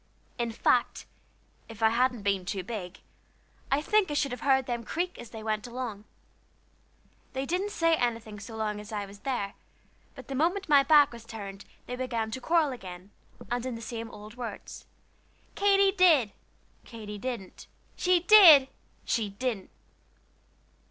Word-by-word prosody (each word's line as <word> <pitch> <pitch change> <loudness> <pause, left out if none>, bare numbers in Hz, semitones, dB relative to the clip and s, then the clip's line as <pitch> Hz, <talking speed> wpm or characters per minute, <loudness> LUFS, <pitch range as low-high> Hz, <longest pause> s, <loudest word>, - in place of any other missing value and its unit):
In 235 -1 -1
fact, 240 +2 +1 0.6
if 225 0 -7
I 220 - +6
hadn't 245 -1 +1
been 195 -2 0
too 190 0 -4
big, 185 -3 -7 0.7
I 280 +2 +2
think 420 +1 +2
I 295 - -3
should 280 -2 0
have 250 - -6
heard 265 -2 +3
them 240 -2 -3
creak 350 +9 -3
as 235 - -9
they 220 -1 -9
went 215 0 -2
along. 235 -4 -6 1.3
They 265 +1 -2
didn't 365 +7 -1
say 330 -5 +2
anything 230 -5 -3
so 215 +3 -9
long 215 -1 -2
as 210 +1 -10
I 205 -2 -3
was 200 +1 -13
there, 220 -7 -3 0.6
but 260 -4 -11
the 275 - -5
moment 350 +8 0
my 290 -3 +6
back 295 0 +5
was 235 -1 -11
turned 200 -4 -9 0.2
they 250 - -5
began 235 -3 -3
to 260 - -5
quarrel 320 -1 +2
again, 185 -5 -9 0.4
and 245 0 -1
in 255 -2 -4
the - - -7
same 230 0 -6
old 210 -1 -11
words 230 -5 -8 0.7
"Katy 395 -1 +4
did." 320 - +5 0.5
"Katy 210 -3 -9
didn't." 235 -5 -6 0.3
"She 360 -1 +2
did." 340 -9 +8 0.4
"She 220 -3 0
didn't." 205 -1 -4
240 Hz, 160 wpm, -28 LUFS, 215-280 Hz, 1.3 s, did